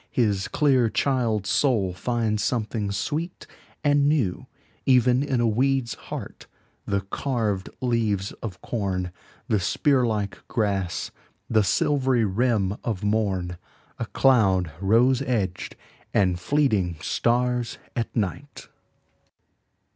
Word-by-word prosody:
His 105 -5 +1
clear 130 -6 +3
child's 115 -7 0
soul 110 -10 +2
finds 110 +1 -1
something 110 -3 -1
sweet 160 - -3 0.4
and 145 0 +4
newEven 125 +1 +1
in 135 -4 0
a 120 - +2
weed's 125 +1 +1
heart, - - -8 0.4
the 100 -1 0
carved 105 -1 -2
leaves 110 -5 0
of 95 -5 -6
corn, 95 -5 -2 0.4
The 105 - +2
spear 130 +7 +2
like 105 -3 -2
grass, 100 -5 -1 0.4
the 110 -2 +3
silvery 130 +4 +2
rim 105 -1 +1
of 110 -4 -3
morn,A 95 -5 -3
cloud 95 -10 +3
rose 120 +6 +4
edged, 105 -9 -2 0.4
and 90 -3 +3
fleeting 105 - +1
stars 120 +7 0 0.2
at 115 - -3
night! 120 +7 -4
110 Hz, 105 wpm, -25 LUFS, 100-125 Hz, 0.4 s, and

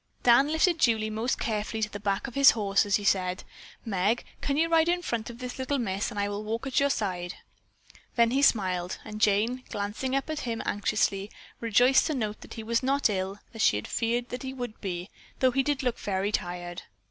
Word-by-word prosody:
Dan 245 +3 +6
lifted 325 +1 +3
Julie 220 -4 +2
most 225 +4 -1
carefully 220 0 -2
to 210 - 0
the 205 - -6
back 200 -1 -1
of 260 - -7
his 275 +1 +7
horse 200 -1 +2
as 200 - +3
he 205 - -1
said: 185 -2 +1 0.4
"Meg, 205 +2 0 0.2
can 280 0 -1
you 325 +2 +3
ride 330 0 +3
in 355 0 +1
front 235 -7 -2
of 235 - -9
this 250 +1 -7
little 260 +2 0
miss 200 -5 -1
and 210 -4 -5
I 200 - +1
will 205 +1 -4
walk 225 +4 -3
at 270 - +1
your 280 0 +3
side?" 185 -7 -2 0.8
Then 235 -1 +4
he 270 +2 +2
smiled, 185 -8 +2
and 215 -1 -7
Jane, 215 +5 +2
glancing 210 +6 -3
at 275 - -1
him 230 -5 -3
anxiously, 200 -1 0 0.3
rejoiced 245 +5 +4
to 310 - -1
note 215 -4 -3
he 225 - -6
was 230 +1 +1
not 270 -2 +2
ill 190 0 -2 0.2
as 225 - -5
she 105 - +5
had 105 - -3
feared 235 +1 0 0.2
he 265 0 -5
would 245 -4 -6
be, 180 -1 -4 0.3
though 260 -1 +3
he 270 +2 +2
did 280 0 -1
look 245 -2 -1
very 195 +1 -1
tired. 175 -2 -3
220 Hz, 210 wpm, -28 LUFS, 200-260 Hz, 0.8 s, his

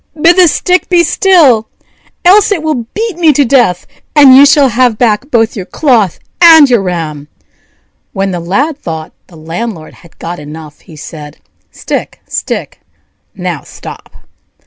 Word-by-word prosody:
bid 335 +3 +4
the 365 -1 +5
stick 360 +3 0
be 350 -2 +3
still, 300 - +2 0.6
else 400 +4 +4
it 345 -6 -1
will 300 -7 -2
beat 440 -4 -3
me 330 -3 +3
to 285 0 +1
death, 235 -9 +1 0.3
and 280 -3 +7
you 280 +2 +7
shall 280 -1 +3
have 240 -1 +1
back 235 +3 0
both 225 -3 0
your 195 - -5
cloth 235 - 0 0.2
and 320 -5 +7
your 235 -4 +2
ram." 160 -6 -5 0.8
When 195 -1 -3
the 175 - -4
Lad 270 - -2
thought 160 - -7
the 175 - -18
landlord 165 +2 -7
had 170 - -20
got 175 +1 -7
enough, 150 0 -11
he 160 - -16
said: 150 0 -11 0.3
"Stick, - - -6
stick! - - -5 0.5
now - - -5
stop!" - - -12
240 Hz, 155 wpm, -10 LUFS, -, 0.8 s, and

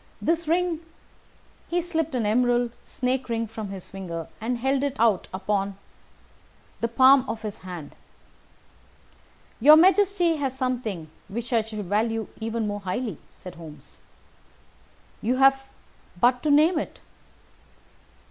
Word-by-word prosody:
This 335 0 0
ring 345 0 +1 0.5
" - - -32
He 350 - +1
slipped 325 -4 -2
an 235 -3 0
emerald 240 +2 +2
snake 255 0 -2
ring 230 0 -1
from 220 -2 -7
his 195 -2 -8
finger 170 -4 -6
and 240 +2 -1
held 265 +2 0
it 280 -1 -2
out 220 -5 +3
upon 195 +1 -2 1.0
the 230 - 0
palm 260 +3 +6
of 225 0 -4
his 210 -2 -5
hand. 175 -5 -8 1.7
"Your 295 +6 +9
Majesty 370 -1 +4
has 270 -3 -3
something 230 - -3 0.2
which 235 +4 -5
I 230 - +4
should 215 -2 -6
value 220 +3 0
even 225 0 -2
more 205 0 -3
highly," 200 - -4
said 180 - -11
Holmes. 160 -3 -13 1.2
"You 240 +4 +1
have 270 0 +4 0.5
but 245 +4 +3
to 305 - 0
name 310 +4 +5
it." - - -6
235 Hz, 135 wpm, -25 LUFS, 205-275 Hz, 1.7 s, Your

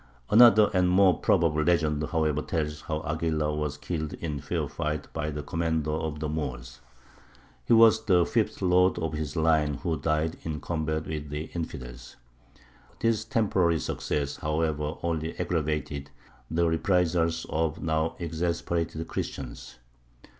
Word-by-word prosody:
Another 110 -2 +7
and 90 -1 +3
more 95 -1 +5
probable 80 -2 +2
legend, 75 -2 +1
however, 75 -2 0
tells 75 -2 -3
how 80 -1 -4
Aguilar 75 -1 -1
was 75 -1 -2
killed 80 0 -4
in 75 -4 -4
fair - - -2
fight 75 -1 -3
by 75 -1 -2
the 75 -1 -5
commander 80 0 -1
of 80 -1 -3
the 75 - -2
Moors. 70 -6 -5 0.9
He - - +3
was 115 -1 +6
the 90 -4 +4
fifth - - -1
lord 90 0 +4
of 80 -2 -2
his 75 -1 -4
line 80 -2 +2
who 80 0 -2
died 75 +2 0
in 80 -2 -4
combat 80 0 -2
with 75 -2 -5
the 75 +2 -5
infidels. 60 -7 -7 0.8
This 115 -1 +1
temporary 100 -7 +2
success, 70 -1 -2
however, 75 0 -1
only 80 -1 -2
aggravated 75 -4 -2 0.4
the 85 +1 +1
reprisals 80 -1 +1
of 80 -1 0
the - - -12
now 80 0 0
exasperated 85 -1 -2
Christians. - - -6
80 Hz, 140 wpm, -27 LUFS, 75-85 Hz, 0.9 s, Another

